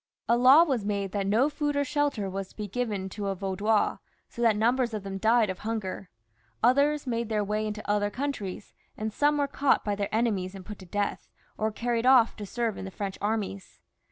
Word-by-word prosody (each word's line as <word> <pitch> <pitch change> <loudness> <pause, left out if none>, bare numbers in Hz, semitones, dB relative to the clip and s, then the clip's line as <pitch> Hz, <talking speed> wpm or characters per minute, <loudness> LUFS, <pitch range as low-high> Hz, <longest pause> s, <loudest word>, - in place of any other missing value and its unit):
A 235 - +4
law 260 +6 +7
was 265 -10 -1
made 200 -2 -2
that 200 -1 -1
no 225 +7 +3
food 295 -1 -2
or 285 - +2
shelter 285 -7 -1
was 195 0 -4
to - - -21
be 210 -1 -5
given 205 -3 -2
to 205 +1 -5
a 195 - -1
Vaudois, 200 +3 0 0.3
so 235 - -8
that 230 -3 +4
numbers 235 +2 +1
of 210 - -5
them 195 -1 -5
died 220 -1 +3
of 185 - -8
hunger, 210 -4 -4 0.5
others 285 +4 +3
made 235 -2 -2
their 210 -2 +1
way 210 +1 -1
into 215 0 -6
other 205 0 +1
coimtries, 215 -6 -5 0.2
and 215 0 -3
some 295 +3 +2
were 285 - +2
caught 280 0 +1
by 205 - 0
their 200 0 -2
enemies 205 -5 0
and 190 -2 -10
put 210 -2 -8
to 185 - -12
death, 205 +3 -2 0.3
or 220 0 -1
carried 235 +2 -1
off 255 -3 +6
to 205 -2 -6
serve 230 0 -2
in - - -5
the - - -5
French 195 +1 -5
armies. 205 -2 -3
215 Hz, 215 wpm, -28 LUFS, 200-245 Hz, 0.5 s, law